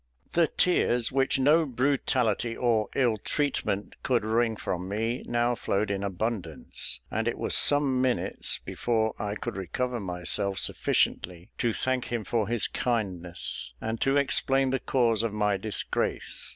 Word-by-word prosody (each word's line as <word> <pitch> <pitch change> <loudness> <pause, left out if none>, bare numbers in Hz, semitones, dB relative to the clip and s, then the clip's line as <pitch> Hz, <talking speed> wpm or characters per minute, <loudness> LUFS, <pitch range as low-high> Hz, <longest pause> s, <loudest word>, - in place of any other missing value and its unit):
The 170 -1 +4
tears 125 -11 +2
which 135 0 +2
no 150 +5 +4
brutality 125 -3 0
or 115 -4 +1
ill 120 -5 +2
treatment 105 -5 -1
could 120 -4 +1
wring 115 +1 +1
from 90 -2 -4
me, 115 +4 -2
now 120 +1 +1
flowed 105 -2 -1
in 100 -1 -2
abundance, 100 +2 -3
and - - -1
it - - -1
was - - 0
some 140 -3 +3
minutes 130 -1 0
before 110 -2 0
I 105 0 -3
could - - -5
recover 120 +6 -3
myself 95 +1 +1
sufficiently 90 -2 0
to 120 - +1
thank 130 +2 -1
him 120 -2 -3
for 110 -1 -1
his 120 -1 +1
kindness, 90 - -2
and 110 0 -4
to 135 +1 +3
explain 135 -1 +2
the 135 - 0
cause 115 -5 +1
of 115 -2 -2
my 105 -1 +1
disgrace. 105 +2 -2
115 Hz, 150 wpm, -27 LUFS, 105-130 Hz, -, The